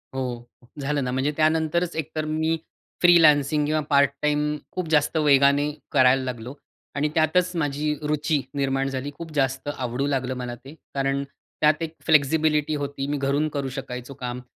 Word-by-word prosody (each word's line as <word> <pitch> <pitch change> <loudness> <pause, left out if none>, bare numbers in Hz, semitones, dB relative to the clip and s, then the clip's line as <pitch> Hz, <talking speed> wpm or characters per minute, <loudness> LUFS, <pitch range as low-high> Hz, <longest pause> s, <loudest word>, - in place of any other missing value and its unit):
हो, 120 -2 -4 0.3
झालं 145 0 -1
ना, 125 - -2
म्हणजे 130 +3 0
त्यानंतरच 160 +2 +1
एकतर 155 0 -3
मी 160 +1 0 0.4
फ्रीलान्सिंग 150 -4 +5
किंवा 155 +1 +1
पार्ट 140 -2 +5
टाईम 150 0 +1 0.2
खूप 180 -2 -2
जास्त 155 0 +2
वेगाने 145 -1 +4 0.2
करायला 130 +1 +4
लागलो 125 0 -5 0.4
आणि 145 +2 0
त्यातच 170 +3 +2
माझी 150 -1 -1
रुची 150 0 0
निर्माण 135 -1 0
झाली. 135 +1 -4
खूप 165 -1 -8
जास्त 135 -1 0
आवडू 125 +2 -2
लागलं 130 -2 -1
मला 125 -1 -5
ते. 135 +4 -13 0.2
कारण 135 0 0
त्यात 150 +2 -1
एक 165 0 -4
फ्लेक्सिबिलिटी 155 0 +3
होती. 140 -1 -4
मी 145 +1 -1
घरून 140 +2 0
करू 140 -2 -3
शकायचो 130 -1 -7
काम 125 -1 -5
145 Hz, 155 wpm, -24 LUFS, 135-155 Hz, 0.4 s, फ्रीलान्सिंग